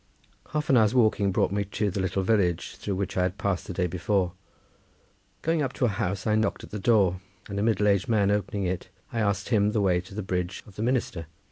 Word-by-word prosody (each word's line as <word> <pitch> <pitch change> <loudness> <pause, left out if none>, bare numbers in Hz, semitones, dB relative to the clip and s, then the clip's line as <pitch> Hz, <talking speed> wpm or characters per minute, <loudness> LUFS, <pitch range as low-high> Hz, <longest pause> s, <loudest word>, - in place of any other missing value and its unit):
Half 150 -1 -1
an 130 - +6
hour's 110 +1 +4
walking 110 -4 +3
brought 95 - +1
me 100 0 0
to 100 +1 -2
the 95 - -3
little 95 0 0
village 95 -5 +1
through 100 - -3
which 95 0 -3
I - - +3
had 90 +2 0
passed 100 -4 -1
the - - -4
day 90 0 0
before. 90 +1 0 1.1
Going 165 -1 +1
up 135 -2 -1
to 125 - +1
a - - +3
house 95 -1 -2
I 110 - +2
knocked 110 +1 0
at - - -11
the 105 - -4
door, 95 -4 +3 0.3
and 100 0 -3
a - - 0
middle 105 -1 +2
aged 100 0 +2
man 100 -3 +3
opening 100 0 -1
it, 90 -1 -3 0.2
I 115 - -1
asked 100 -1 0
him 105 -3 +3
the 105 - +1
way 90 -3 +2
to 90 +2 -13
the 105 - -3
Bridge 90 0 -3
of 100 - -16
the - - -5
Minister. 115 -9 -1
100 Hz, 240 wpm, -27 LUFS, 95-110 Hz, 1.1 s, an